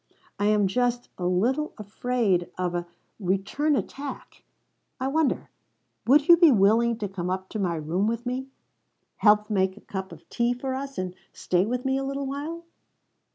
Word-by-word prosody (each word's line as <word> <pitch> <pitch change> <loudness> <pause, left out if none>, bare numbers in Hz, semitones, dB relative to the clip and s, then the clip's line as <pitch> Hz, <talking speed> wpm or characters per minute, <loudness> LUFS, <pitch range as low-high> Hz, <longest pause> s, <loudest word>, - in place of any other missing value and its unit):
I 205 - +1
am 210 -1 +3
just 245 +4 0
a 180 - 0
little 245 +12 +1
afraid 210 -4 0
of 180 -1 -1
a 175 - 0
a 175 - -7 0.3
return 200 +11 0
attack. 275 +1 -6 0.6
I 260 - -1
wonder 300 +1 0 0.6
would 290 +3 +5
you 345 - +9
be 335 -3 +7
willing 225 +2 +4
to 210 -3 -3
come 180 -2 -4
up 190 0 -3
to 215 - -4
my 180 -4 0
room 165 +6 -1
with 230 +2 -2
me 255 +2 -3 0.7
help 210 0 +4
make 190 -1 +1
a - - -13
cup 190 -1 -6
of - - -13
tea 240 +1 0
for 260 +1 -3
us 275 +1 -5
and 185 -1 -3 0.2
stay 180 +2 +1
with 250 +2 -2
me 265 0 +1
a - - -3
little 275 +1 -3
while?" 300 +5 -5
230 Hz, 180 wpm, -26 LUFS, 190-265 Hz, 0.7 s, you